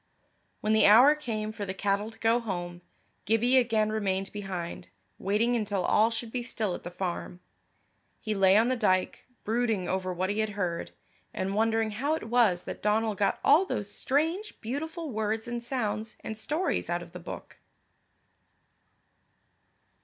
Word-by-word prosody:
When 215 +1 +1
the 220 - +6
hour 245 +8 +8
came 220 -8 -4
for 210 - -6
the 190 -1 -4
cattle 200 +2 0
to 225 - -14
go 225 +2 +2
home, 175 -6 -5 0.4
Gibbie 230 +4 +3
again 220 -4 +2
remained 195 -3 -1
behind, 185 -4 -5 0.3
waiting 220 +5 +1
until 205 -4 -1
all 220 +2 +4
should 230 0 -5
be 250 - -2
still 220 -5 -2
at - - -6
the 175 - -6
farm. 175 0 -4 0.8
He 215 - -2
lay 195 -1 +5
on 225 +2 +4
the 255 - +1
dyke, 185 -6 0 0.2
brooding 220 -4 0
over 185 0 -1
what 185 +2 -1
he 210 - -2
had 215 0 +1
heard, 175 -4 -2 0.5
and 190 +1 -2
wondering 225 +1 +1
how 280 +9 0
it - - -6
was 220 -7 +3
that - - -7
Donal 215 +1 +1
got 200 -1 0
all 300 +6 +6
those 205 - -3
strange 325 +10 -1
beautiful 310 +6 -4
words 220 0 -2
and 240 0 -4
sounds 220 -3 -3
and 220 - -5
stories 300 - -1
out - - -1
of - - -14
the - - -8
book. - - -9
215 Hz, 165 wpm, -28 LUFS, 195-240 Hz, 0.8 s, hour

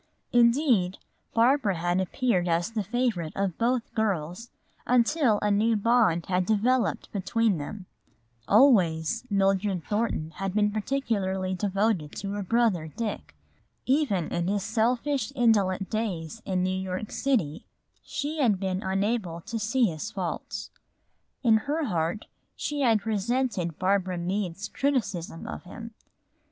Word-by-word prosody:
Indeed, 235 - +3 0.4
Barbara 230 -3 +3
had 175 +2 +1
appeared 190 -1 0
as 170 +4 0
the 225 -2 -1
favorite 215 -7 -1
of 195 -3 -2
both 240 0 0
girls, 200 0 -2 0.4
until 250 -1 +3
a 210 - +2
new 220 +3 +3
bond 215 -6 +3
had 180 -1 0
developed 225 +2 +1
between 200 -1 +1
them. 185 +6 -7 0.6
Always 210 - +4
Mildred 195 -2 +1
Thornton 205 -7 -1
had 195 0 -3
been 210 -1 +3
peculiarly 205 -5 -1
devoted 195 -4 0
to 200 0 -4
her 205 0 -3
brother, 200 -5 +1
Dick. 215 +6 -5 0.5
Even 255 - +1
in 175 0 -1
his 200 0 0
selfish, 240 +4 0
indolent 200 -6 +2
days 215 -3 -3
in 185 -2 0
New 185 - +1
York 190 +2 -4
City 215 - -1 0.3
she 300 +2 -4
had 220 -9 +3
been 190 -1 -2
unable 195 -3 -1
to 225 +6 -5
see 230 +4 +2
his 170 +1 -3
faults. 195 +2 -5 0.7
In 225 -3 +5
her 310 +3 0
heart 175 -1 -1 0.3
she 295 -1 -3
had 225 -5 +3
resented 215 - -1
Barbara 190 -1 +1
Meade's 185 +2 -2
criticism 200 -13 -2
of - - -6
him. 230 +5 -9
205 Hz, 130 wpm, -27 LUFS, 185-235 Hz, 0.7 s, In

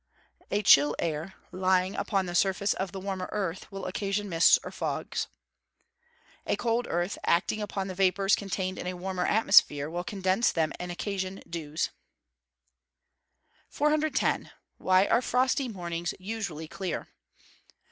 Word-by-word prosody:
A 205 +1 0
chill 145 -3 +6
air, 165 +2 -3 0.2
lying 185 0 +1
upon 195 -3 0
the 175 - -5
surface 195 +2 +2
of 190 -1 -3
the 195 - -6
warmer 190 -1 -4
earth, 190 -3 -3
will 195 -1 -6
occasion 200 +2 -2
mists 165 -3 +6
or - - -7
fogs. - - -3 1.2
A - - +2
cold 235 +1 0
earth, 175 +3 -1
acting 180 +5 +1
upon 195 -2 -3
the 190 - -4
vapours 195 +1 +3
contained 190 -1 -3
in - - -5
a 180 - -3
warmer 185 0 -2
atmosphere, 150 -8 +4
will 175 +1 -3
condense 190 +3 +1
them 160 -2 0
and 180 0 -4
occasion 190 +1 -4
dews. 155 -2 -3 1.8
410. 300 -1 +1 0.3
_Why 185 +1 +4
are 235 - +3
frosty 255 +2 +1
mornings 175 -5 -4
usually 185 -6 -5
clear? 185 +2 -4
190 Hz, 135 wpm, -28 LUFS, 175-205 Hz, 1.8 s, chill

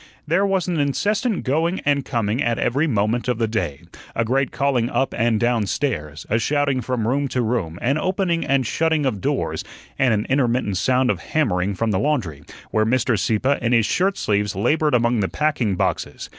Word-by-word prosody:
There 175 +6 +2
was 190 -2 0
an 175 -3 -1
incessant 205 - 0
going 165 +7 0
and 140 -1 +1
coming 115 +1 -1
at 120 0 +1
every 140 +8 +1
moment 110 -1 0
of 125 -2 0
the 115 -1 0
day, 105 -11 -3 0.3
a 115 - +1
great 135 +3 +1
calling 130 -4 0
up 135 - 0
and 115 -1 +1
down 120 -3 +1
stairs, 80 - -3
a 115 - +1
shouting 140 +1 +1
from 125 -3 -2
room 140 +3 +1
to 125 -2 -1
room, 110 -8 -2
an 135 +5 +1
opening 185 -2 0
and 135 -2 +1
shutting 160 +3 +1
of 105 -8 -1
doors, - - -1 0.4
and 130 -2 +3
an 105 -1 0
intermittent 125 -7 +1
sound 125 +6 +2
of - - -3
hammering 100 -11 0
from 115 +3 0
the 95 - +1
laundry, 105 - -1 0.3
where 110 - +2
Mr. 120 +2 +1
Sieppe 115 +7 0
in 120 +1 +1
his 115 -3 +4
shirt 195 - +1
sleeves 105 -1 0
labored 150 +8 +2
among 120 -1 +2
the 95 - 0
packing 145 -10 0
boxes. - - -2
125 Hz, 195 wpm, -21 LUFS, 110-145 Hz, 0.4 s, his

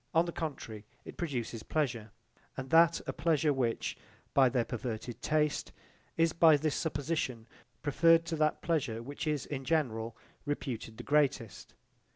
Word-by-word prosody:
On 165 +1 +5
the 170 - -3
contrary 135 -11 -5 0.2
it - - -9
produces 120 -8 -3
pleasure, 120 -8 -1 0.5
and 135 0 -6
that 165 +1 +6
a - - -3
pleasure 155 -1 +2
which, 120 -4 -1 0.4
by 135 -2 +6
their 125 -2 +1
perverted 120 0 -5
taste, 150 -1 0 0.5
is 165 -1 +3
by 160 -2 +6
this 155 0 0
supposition 145 -6 -2 0.4
preferred 165 +3 +4
to 165 - -2
that 155 0 +1
pleasure 135 -9 -1
which 145 +5 -5
is 150 -3 0
in 135 -2 -5
general 115 -7 -1 0.3
reputed 125 -6 -4
the - - -7
greatest. 140 - 0
145 Hz, 150 wpm, -32 LUFS, 120-160 Hz, 0.5 s, that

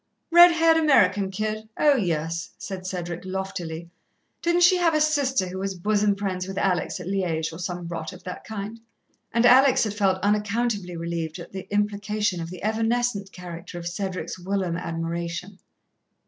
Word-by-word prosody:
"Red 345 +1 +9
haired 325 0 +4
American 205 -11 +4
kid? 215 +2 -3
Oh, 295 -2 +5
yes," 165 - -1
said 185 -2 -6
Cedric 175 -2 -4
loftily. 180 -3 -5 0.5
"Didn't 345 +1 +3
she 360 +1 +6
have 335 -3 +2
a - - +3
sister 280 -9 +2
who 190 +1 -5
was 195 0 -3
bosom 205 +2 +1
friends 190 -2 -3
with 195 0 -6
Alex 185 -1 0
at 180 - -7
Liège, 170 -4 -1
or 160 - -8
some 180 -1 -4
rot 165 -2 -5
of - - -13
that 180 - -7
kind?" 220 +1 -6 0.5
And 235 +1 +2
Alex 260 +1 +6
had 215 -2 -2
felt 195 -3 +2
unaccountably 205 -2 0
relieved 165 -1 -3
at 170 - -10
the 190 0 -8
implication 205 -2 0
of 165 - -5
the 180 0 -9
evanescent 225 -2 0
character 175 -1 -8
of 170 - -7
Cedric's 185 +1 -4
whilom 185 -1 -1
admiration. 170 +2 -4
195 Hz, 165 wpm, -25 LUFS, 175-220 Hz, 0.5 s, Red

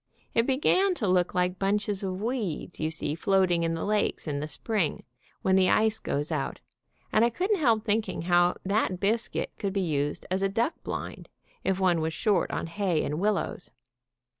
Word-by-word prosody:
It 230 +1 +2
began 365 +8 +3
to 215 - -1
look 180 -1 +2
like 180 0 0
bunches 205 0 0
of 185 -1 -3
weeds 215 - -3
you 155 - 0
see 160 -2 -3
floating 185 0 +2
in 165 0 0
the 165 - -3
lakes 210 -4 0
in 145 -2 -1
the 150 - -3
spring, 180 +3 -1 0.4
when 190 - +3
the 185 -1 +4
ice 220 0 +3
goes 145 +3 -2
out, 150 -4 -2 0.5
and 215 - +5
I 235 - +4
couldn't 375 - 0
help 230 -7 +2
thinking 215 -5 0
how 175 0 +3
that 195 -2 +1
biscuit 220 +4 0
could 200 -3 -2
be 200 - 0
used 145 -4 -1
as 190 +1 +1
a 195 - +2
duck 230 - 0
blind, - - -6 0.3
if 190 0 0
one 180 -3 +3
was 160 0 -1
short 205 -6 +1
of - - -3
hay 180 -3 0
and 150 +2 -2
willows. 205 +1 -1
190 Hz, 190 wpm, -28 LUFS, 170-215 Hz, 0.5 s, and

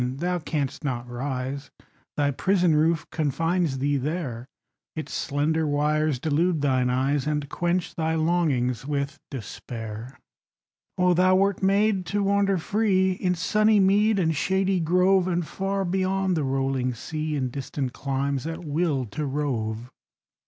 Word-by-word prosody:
Thou 170 +9 -1
canst 150 -3 -3
not 125 -4 -3
rise: 130 +2 -4 0.5
Thy 145 -1 +2
prison 180 +3 +2
roof 160 +1 +2
confines 165 0 0
thee 140 +2 +1
there; 135 -4 -3 0.5
Its 155 - -5
slender 155 +2 0
wires 150 0 +1
delude 160 +4 +1
thine 130 -3 +2
eyes, 135 +3 +1
And 150 -1 -1
quench 175 0 -1
thy 160 0 -1
longings 155 -8 +1
with 140 0 -2
despair. 115 0 -7 0.8
Oh, 180 0 +4
thou 185 +2 +4
wert 195 0 +2
made 195 -1 +2
to 205 0 0
wander 200 -1 +2
free 190 +1 +2
In 180 -1 0
sunny 215 +4 +3
mead 205 +3 +4
and 160 -4 +1
shady 190 +4 +1
grove, 180 +3 +3
And 175 -2 0
far 195 +3 -2
beyond 190 +1 0
the 155 - 0
rolling 135 -2 0
sea, 155 +4 -3
In 130 -3 -1
distant 135 -1 -4
climes, 140 +1 -2
at 165 +1 -5
will 150 -3 0
to 145 +8 -4
rove! 125 -5 -2
155 Hz, 140 wpm, -25 LUFS, 135-180 Hz, 0.8 s, Oh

